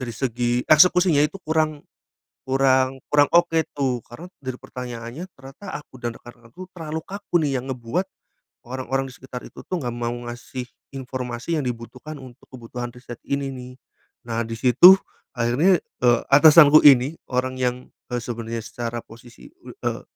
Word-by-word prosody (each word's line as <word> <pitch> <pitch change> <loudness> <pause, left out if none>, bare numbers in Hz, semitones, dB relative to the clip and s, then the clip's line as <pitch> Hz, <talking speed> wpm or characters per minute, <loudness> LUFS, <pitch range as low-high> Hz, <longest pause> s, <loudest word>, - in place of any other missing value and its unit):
dari 120 -2 -5
segi, 120 0 -1
eksekusinya 175 -1 +5
itu 195 - -3
kurang 155 -2 0 0.6
kurang 130 0 +2
kurang 145 -1 +5
oke 170 -1 +4 0.2
tuh, 130 -4 0
karena 120 +9 -10 0.2
dari 130 -1 -5
pertanyaannya, 125 +4 -7
ternyata 135 +9 -9
aku 145 - -15
dan 120 -1 -2
rekan-rekanku, 120 +8 -13
terlalu 160 -1 -4
kaku 200 -3 -1
nih, 135 -3 0
yang 130 - -10
ngebuat, 125 +8 -2 0.7
orang-orang 130 +1 -3
di - - -13
sekitar 125 -1 -9
itu, - - -13
tuh, 185 - -3
enggak 120 -2 -4
mau 120 0 -2 0.2
ngasih 125 +1 -7 0.3
informasi 130 +2 -4
yang 150 - -1
dibutuhkan 125 +5 -7
untuk 125 -2 -14
kebutuhan 120 -1 -7
riset 125 -1 -10
ini, 140 0 -2
nih. 125 -1 -9 0.5
Nah, 115 0 -1
di 115 0 -5
situ, 130 +9 +8 0.4
akhirnya, 130 +10 +3 0.2
eee, 120 -1 +4
atasanku 150 +1 +8
ini 140 +2 +6 0.2
orang 130 +1 -1
yang, 125 -1 0 0.4
eee, 125 - -1
sebenarnya 115 -1 -5
secara 115 +2 -5
posisi, 120 - -15 0.2
l - - -10
eee, - - -1
130 Hz, 155 wpm, -23 LUFS, 120-150 Hz, 0.7 s, situ